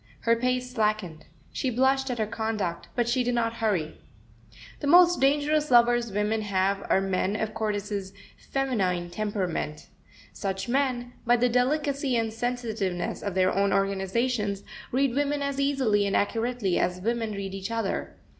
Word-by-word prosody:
Her 230 0 +3
pace 250 +1 -1
slackened. 210 -8 -1 0.3
She 260 - -1
blushed 265 +2 +2
at 245 - -2
her 220 - +1
conduct, 215 -5 -3
but 240 -2 +1
she 250 +1 +1
did 245 0 0
not 230 -1 0
hurry. 185 -8 -1 0.8
The 285 - -3
most 350 +3 +6
dangerous 295 +2 +2
lovers 240 -1 +4
women 210 +2 0
have 195 -1 0
are - - +4
men 195 +1 0
of 215 0 -2
Cordis's 205 -3 -3 0.4
feminine 190 -11 0
temperament. 185 -6 -3 0.4
Such 195 0 -3
men, 245 -1 0
by 240 0 +4
the 245 +1 +2
delicacy 275 +2 +1
and 225 -1 -1
sensitiveness 225 -7 -2
of 200 -3 -4
their 185 0 +3
own 200 +1 +2
organizations, 200 +2 0 0.3
read 265 0 +2
women 285 +1 0
as 280 -1 -2
easily 260 -8 +2
and 200 - 0
accurately 225 -2 0
as 180 +1 0
women 225 +2 -1
read 195 -1 -5
each 195 +1 -5
other. 225 -3 -2
225 Hz, 155 wpm, -27 LUFS, 195-250 Hz, 0.8 s, most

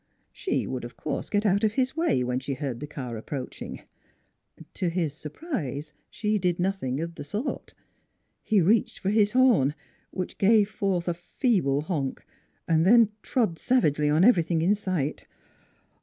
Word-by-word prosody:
She 390 - -2
would, - - -4
of - - -9
course, - - -4
get 205 +1 0
out 200 0 +2
of 215 -1 +2
his 260 +3 0
way 320 - +1
when 125 +1 -1
she 135 +1 -4
heard 130 -3 -4
the 150 - -6
car 125 -6 -6
ap - - -14
proaching. 135 -3 -6 0.9
To 180 - -1
his 165 -4 -1
surprise 150 - -5 0.2
she 210 -1 -1
did 180 -2 0
nothing 175 -8 -1
of 170 +1 -4
the - - -8
sort. 210 - -4 0.7
He 210 -3 +2
reached 205 +6 +2
for 195 0 -1
his 210 0 +3
horn, 240 - +4 0.3
which 185 -1 -5
gave 210 0 +4
forth 190 -4 -1
a 175 - +1
feeble 175 - 0
honk; 150 -5 -3 0.4
then 195 +8 +5
trod 215 -10 0
savagely 150 - +2
on 155 +4 +4
every 205 -5 +6
thing 165 0 0
in 190 +4 +4
sight. 185 -8 -2
180 Hz, 165 wpm, -26 LUFS, 150-210 Hz, 0.9 s, every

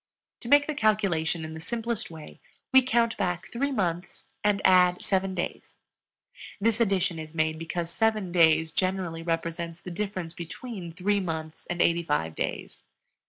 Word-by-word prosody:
To - - -10
make 290 +1 +6
the 305 - -2
calculation 195 - +1
in 155 - -7
the 160 - -7
simplest 230 +5 -3
way 160 -2 -11 0.3
we 265 - +9
count 235 -2 +2
back 180 -2 -1
three 280 +4 -1
months 180 -7 -3
and 205 -1 +3
add 180 -1 +5
seven 190 -1 0
days; 175 - -5 0.8
this 225 +2 +2
addition 190 -5 +1
is 155 0 -8
made 155 0 0
because 165 +1 -3
seven 215 -3 +1
days 160 -2 +4
generally 185 -2 -1
represents 165 0 -3
the 180 - -8
difference 185 -3 -4
between 175 +2 -7
three 200 +4 0
months 160 -4 -5
and 175 0 +1
eighty 170 0 +3
five 80 - -1
days. 65 -3 -4
180 Hz, 160 wpm, -27 LUFS, 165-210 Hz, 0.8 s, we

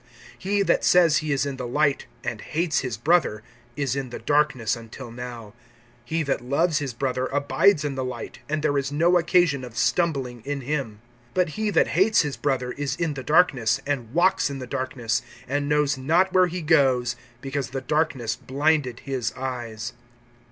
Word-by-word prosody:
(9)He 200 +1 +1
that - - +2
says 170 -4 +5
he 155 -1 -2
is 140 0 +1
in 140 -2 -4
the 125 -2 -4
light, 140 +2 +1 0.2
and - - -4
hates 165 0 0
his 125 -5 -3
brother, 130 -5 +2 0.3
is 140 -2 -1
in 135 -2 -3
the 120 - -6
darkness 145 -7 +1
until 115 +1 -10
now. 120 -3 -8 0.6
(10)He 160 -1 0
that 140 - -1
loves 145 +5 +1
his 140 -3 -3
brother 130 +1 -2
abides 145 +3 +2
in 145 - -1
the 130 -1 -3
light, 125 -3 -6
and 155 0 -1
there 145 -2 +2
is 135 0 -3
no 170 +4 +4
occasion 170 -5 +2
of 120 -2 -9
stumbling 135 -6 0
in 140 +1 -3
him. 130 -6 -3 0.3
(11)But 180 -1 +3
he 215 +6 -2
that - - +3
hates 200 +5 +4
his 145 -2 -3
brother 130 -3 -1
is 145 0 -3
in 165 -3 -1
the 135 - -6
darkness, 135 -5 +3
and 130 -6 -2
walks 175 +1 +3
in 140 - -5
the 130 - -6
darkness, 130 -3 -2 0.3
and 145 +2 -1
knows 150 -2 +2
not 170 +8 +2
where 185 -1 +5
he 175 0 -5
goes, 130 -6 +3 0.2
because 135 0 -3
the 135 +1 -3
darkness 130 -5 0
blinded 140 -2 0
his 130 -4 -2
eyes. 120 -3 -5
140 Hz, 185 wpm, -24 LUFS, 125-155 Hz, 0.6 s, says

